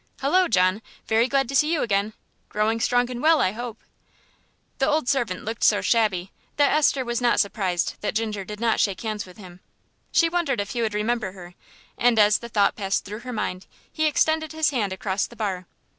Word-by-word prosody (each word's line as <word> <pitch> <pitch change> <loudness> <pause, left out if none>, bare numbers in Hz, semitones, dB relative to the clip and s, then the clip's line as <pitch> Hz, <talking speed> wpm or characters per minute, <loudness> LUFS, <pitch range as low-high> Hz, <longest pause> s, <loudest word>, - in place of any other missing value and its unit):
Hullo, 360 +7 +3
John! 185 +1 +2 0.2
very 225 +2 +2
glad 270 0 +1
to 275 - -3
see 300 +3 +3
you 330 - +1
again; 205 0 0 0.4
growing 215 +2 0
strong 245 +1 +2
and 245 -1 -5
well, 320 +1 +4
I 185 - +2
hope?" 235 +2 -6 1.0
The 270 - +2
old 305 -3 +1
servant 240 -9 -1
looked 225 +1 -4
so 205 - +5
shabby 200 -5 +1 0.3
that 290 -1 +4
Esther 290 -3 +2
was 240 0 -2
not 240 -1 +3
surprised 190 -4 -1
that 210 - -2
Ginger 215 -3 -2
did 210 +2 -8
not 230 -1 +1
shake 195 -4 0
hands 215 -3 -4
with 180 - -15
him. 180 -3 -12 0.5
She 335 - +4
wondered 330 -8 -1
if 200 0 -3
he 240 - -2
would 220 -2 -1
remember 215 -2 -1
her, 180 -2 -12 0.5
and 240 -1 +3
as 210 -1 +5
the 235 - -9
thought 205 -3 +2
passed 195 -2 -2
through 210 +2 -7
her 250 +1 -7
mind 185 -4 -4 0.3
he 310 0 +1
extended 315 +1 +1
his 315 -1 +1
hand 215 -8 -1
across 190 +1 -2
the 235 - -15
bar. 190 -5 -3
225 Hz, 205 wpm, -24 LUFS, 200-260 Hz, 1.0 s, so